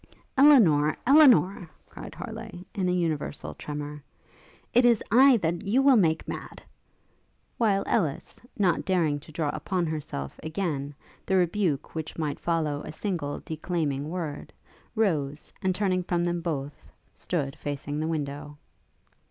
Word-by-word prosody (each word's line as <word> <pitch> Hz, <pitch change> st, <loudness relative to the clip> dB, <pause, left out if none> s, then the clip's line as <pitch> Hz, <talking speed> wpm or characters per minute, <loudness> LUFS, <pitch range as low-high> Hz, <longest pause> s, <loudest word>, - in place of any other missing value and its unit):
'Elinor! 205 Hz, -, +5 dB
Elinor!' 245 Hz, -, +5 dB, 0.2 s
cried -, -, -10 dB
Harleigh, 220 Hz, -5 st, -8 dB
in 190 Hz, -4 st, -1 dB
a -, -, +2 dB
universal 165 Hz, -5 st, -2 dB
tremour, 150 Hz, 0 st, -7 dB, 0.7 s
'it 245 Hz, +2 st, +5 dB
is 235 Hz, -3 st, +4 dB
I 260 Hz, +2 st, +7 dB
that 170 Hz, -1 st, -2 dB
you 250 Hz, +7 st, +3 dB
will 275 Hz, -1 st, +6 dB
make 160 Hz, -7 st, +2 dB
mad!' -, -, -7 dB, 1.0 s
while 200 Hz, -4 st, +2 dB
Ellis, 160 Hz, -11 st, -1 dB, 0.2 s
not 185 Hz, -6 st, +2 dB
daring 165 Hz, -6 st, +1 dB
to 150 Hz, -, -14 dB
draw 155 Hz, -1 st, -1 dB
upon 180 Hz, +3 st, -2 dB
herself, 150 Hz, -, -5 dB
again, 155 Hz, -4 st, -3 dB, 0.3 s
the 190 Hz, -, +2 dB
rebuke 175 Hz, -5 st, 0 dB
which 160 Hz, -1 st, -6 dB
might 150 Hz, -3 st, -2 dB
follow 155 Hz, -4 st, -1 dB
a -, -, -7 dB
single 160 Hz, -4 st, -3 dB
declaiming 155 Hz, -3 st, -2 dB
word, 160 Hz, -4 st, -5 dB, 0.4 s
rose, 150 Hz, -10 st, 0 dB
and 190 Hz, -2 st, 0 dB
turning 185 Hz, -2 st, +1 dB
from 175 Hz, -1 st, -1 dB
them 175 Hz, 0 st, -1 dB
both, 145 Hz, -4 st, -5 dB, 0.2 s
stood 140 Hz, -6 st, -3 dB
facing 145 Hz, +1 st, -4 dB
the 155 Hz, -, -1 dB
window. 145 Hz, -2 st, -4 dB
165 Hz, 135 wpm, -27 LUFS, 150-195 Hz, 1.0 s, I